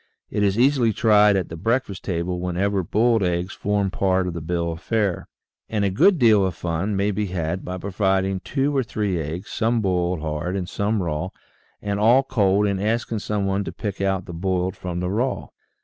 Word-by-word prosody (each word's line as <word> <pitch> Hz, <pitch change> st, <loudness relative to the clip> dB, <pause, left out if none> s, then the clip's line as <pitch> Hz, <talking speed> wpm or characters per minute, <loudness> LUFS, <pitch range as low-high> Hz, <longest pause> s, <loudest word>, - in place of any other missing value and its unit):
It 105 Hz, -, -1 dB
is 100 Hz, 0 st, +2 dB
easily 125 Hz, -3 st, +3 dB
tried 105 Hz, -2 st, +5 dB
at 95 Hz, -2 st, -1 dB
the 80 Hz, -, -6 dB
breakfast 115 Hz, +2 st, -1 dB
table 90 Hz, -1 st, -2 dB
whenever 95 Hz, +3 st, 0 dB
boiled 115 Hz, +5 st, +2 dB
eggs 90 Hz, +1 st, -1 dB
form 100 Hz, -1 st, 0 dB
part 95 Hz, -1 st, +1 dB
of 90 Hz, -, -3 dB
the 85 Hz, -, -5 dB
bill 85 Hz, +1 st, -1 dB
of 80 Hz, -, -7 dB
fare. 105 Hz, -5 st, -1 dB, 0.4 s
And 105 Hz, -2 st, 0 dB
a 100 Hz, -, +1 dB
good 185 Hz, -, +4 dB
deal 110 Hz, -7 st, +5 dB
of 95 Hz, -3 st, -1 dB
fun 90 Hz, +5 st, -2 dB
may 100 Hz, +2 st, +1 dB
be 105 Hz, +1 st, -2 dB
had 90 Hz, 0 st, -3 dB
by 90 Hz, 0 st, -5 dB
providing 95 Hz, 0 st, 0 dB
two 140 Hz, +7 st, -1 dB
or 135 Hz, -, +3 dB
three 105 Hz, -7 st, -2 dB
eggs, 80 Hz, +5 st, -6 dB
some 115 Hz, +1 st, +1 dB
boiled 90 Hz, -4 st, 0 dB
hard 80 Hz, +4 st, -3 dB
and 90 Hz, -2 st, -3 dB
some 100 Hz, +1 st, -1 dB
raw 85 Hz, +2 st, -2 dB, 0.5 s
and 100 Hz, 0 st, -1 dB
all 120 Hz, +5 st, +5 dB
cold 100 Hz, -5 st, +2 dB
and 100 Hz, -2 st, 0 dB
asking 115 Hz, +1 st, -1 dB
some 105 Hz, -1 st, -2 dB
one 100 Hz, +1 st, 0 dB
to -, -, -5 dB
pick 100 Hz, -3 st, -5 dB
out 95 Hz, -2 st, 0 dB
the 85 Hz, -, -8 dB
boiled 95 Hz, +2 st, -1 dB
from 90 Hz, -2 st, -4 dB
the 90 Hz, -, -1 dB
raw. 125 Hz, +6 st, -1 dB
95 Hz, 205 wpm, -23 LUFS, 90-105 Hz, 0.5 s, tried